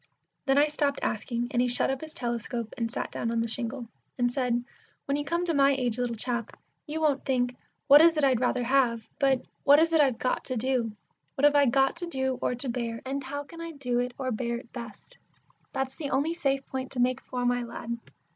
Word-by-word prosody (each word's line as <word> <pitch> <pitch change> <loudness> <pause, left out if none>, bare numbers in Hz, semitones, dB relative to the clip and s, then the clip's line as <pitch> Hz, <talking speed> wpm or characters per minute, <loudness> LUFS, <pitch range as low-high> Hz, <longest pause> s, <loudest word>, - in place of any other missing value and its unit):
Then 270 +1 +4
I 290 - +6
stopped 290 -1 0
asking, 235 +2 -2
and 245 -3 +2
he 250 - +2
shut 245 +2 +2
up 270 - -3
his 315 -1 -8
telescope, 235 -1 -3
and 230 -1 -2
sat 240 - -4
down 230 - -2
on 230 0 0
the 230 - 0
shingle, 235 +2 -4 0.3
and 245 -1 +2
said, 245 -3 0 0.4
"When 280 - 0
you 290 - -1
come 340 +4 -1
to 335 - 0
my 280 -1 +5
age, 250 -3 -1
little 245 -1 -1
chap, 235 0 -3 0.3
you 305 +2 -3
won't 295 -4 +2
think 250 -2 0 0.3
'What 290 +1 +9
is 330 -1 +6
it 300 - +1
I'd 260 -4 +4
rather 250 0 +1
have?' 240 -3 +2
but, 270 -2 +2 0.2
'What 285 +1 +7
is 330 +1 +3
it 320 - +6
I've 265 -5 +3
got 255 - -1
to 255 - -2
do?' 240 -2 0 0.4
'What 280 - +2
have 290 - +6
I 285 -1 +5
got 270 +5 +3
to 350 0 -3
do 265 -5 -1
or - - 0
to 250 +3 -4
bear; 235 -2 -3
and 275 +1 -3
how 285 +2 -4
can 335 +4 -11
I 335 0 -6
do 250 -4 -1
it 245 0 -2
or 260 -1 -2
bear 235 +1 -2
it 240 0 -13
best?' 235 - -9 0.5
That's 265 0 -2
the 290 -4 -4
only 285 +5 +1
safe 275 -5 0
point 260 0 -5
to 255 - -4
make 255 +1 +2
for, 250 -1 -3
my 245 0 +2
lad. 235 0 -5
260 Hz, 235 wpm, -28 LUFS, 240-280 Hz, 0.5 s, What